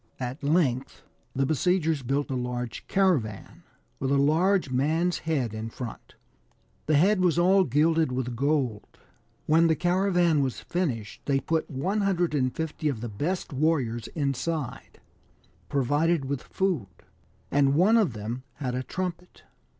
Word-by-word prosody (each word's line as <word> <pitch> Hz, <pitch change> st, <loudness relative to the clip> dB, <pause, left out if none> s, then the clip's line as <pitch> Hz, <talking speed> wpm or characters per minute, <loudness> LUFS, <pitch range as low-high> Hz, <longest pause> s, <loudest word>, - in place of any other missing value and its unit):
At 130 Hz, +2 st, -4 dB
length 140 Hz, -4 st, 0 dB, 0.3 s
the 135 Hz, +1 st, +2 dB
besiegers 160 Hz, +1 st, +1 dB
built 135 Hz, +3 st, -1 dB
a -, -, -1 dB
large 125 Hz, -1 st, -4 dB
caravan, 155 Hz, -, 0 dB, 0.4 s
with 135 Hz, -, -1 dB
a 140 Hz, -, +3 dB
large 160 Hz, +3 st, +2 dB
man's 160 Hz, +7 st, +1 dB
head 130 Hz, -9 st, 0 dB
in 110 Hz, +1 st, -5 dB
front; 120 Hz, 0 st, -8 dB, 0.7 s
the 155 Hz, -, +3 dB
head 185 Hz, +6 st, +4 dB
was 175 Hz, -3 st, +2 dB
all 190 Hz, +3 st, +5 dB
gilded 155 Hz, +2 st, +2 dB
with 125 Hz, -1 st, -3 dB
gold. 135 Hz, -5 st, -1 dB, 0.5 s
When 165 Hz, +2 st, +4 dB
the 160 Hz, -, +3 dB
caravan 175 Hz, -3 st, +2 dB
was 130 Hz, -3 st, -2 dB
finished 135 Hz, -, -3 dB
they 140 Hz, -1 st, +2 dB
put 160 Hz, +3 st, -1 dB
150 160 Hz, -3 st, 0 dB
of 120 Hz, -6 st, -4 dB
the 120 Hz, -, -4 dB
best 150 Hz, -, -3 dB
warriors 130 Hz, -6 st, 0 dB
inside, 145 Hz, 0 st, -3 dB, 0.7 s
provided 145 Hz, +3 st, +1 dB
with 140 Hz, -1 st, -3 dB
food, 180 Hz, -, -1 dB, 0.6 s
and 140 Hz, -1 st, +3 dB
one 190 Hz, +8 st, +5 dB
of 210 Hz, -, +3 dB
them 110 Hz, +4 st, -5 dB
had 130 Hz, -3 st, -4 dB
a 125 Hz, -, -1 dB
trumpet. 180 Hz, +5 st, -5 dB
145 Hz, 135 wpm, -27 LUFS, 130-170 Hz, 0.7 s, all